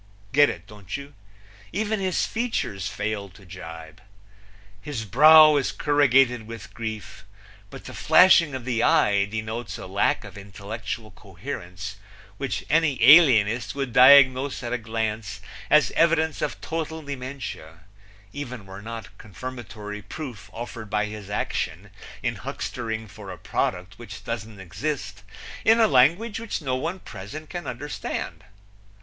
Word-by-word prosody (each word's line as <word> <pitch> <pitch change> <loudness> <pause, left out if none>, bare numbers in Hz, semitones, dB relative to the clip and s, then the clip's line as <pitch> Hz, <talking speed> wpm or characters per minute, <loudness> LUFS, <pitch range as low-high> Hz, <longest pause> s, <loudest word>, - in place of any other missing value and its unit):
Get 145 +1 +5
it, 85 - -7
don't 105 -1 -7
you? 140 +1 -11 0.6
Even 215 +2 -1
his 185 -2 0
features 220 - -2
fail 105 -1 -3
to 95 +2 -18
jibe. 80 -3 -10 0.8
His 115 -2 -5
brow 155 - +8
is 135 - 0
corrugated 135 -5 +3
with 115 -2 -9
grief, 110 -2 -6 0.5
but - - -11
the - - -8
flashing 170 -6 +5
of 130 -2 -6
the 120 -3 0
eye 100 -3 +3
denotes 110 +3 -5
a - - -8
lack - - 0
of - - -10
intellectual 105 +2 -7
coherence 95 -1 -8 0.4
which 130 -7 -3
any 155 -3 +2
alienist 125 -7 +6
would 135 -4 -3
diagnose 130 0 +6
at 120 - -3
a 125 - -1
glance 110 -3 -3 0.3
as 150 0 +5
evidence 160 -2 +2
of 150 - -2
total 160 0 -4
dementia, 125 - -7 0.5
even 125 -7 -7
were 95 +1 -10
not 115 -1 -8
confirmatory 105 -2 -8
proof 120 - -8
offered 115 -2 -7
by 105 +1 0
his 105 -2 -8
action 100 - -3 0.3
in - - -1
huckstering 110 -2 -5
for 100 0 -11
a 90 - -7
product 95 +3 -3
which 100 -4 -10
doesn't 110 -2 -6
exist, 105 - -5 0.4
in 225 +1 +5
a 225 - +6
language 170 - +3
which 230 -1 -4
no 130 -5 -2
one 165 +8 -3
present 150 - -9
can 175 -1 -6
understand. 125 -5 -5
115 Hz, 140 wpm, -24 LUFS, 105-145 Hz, 0.8 s, brow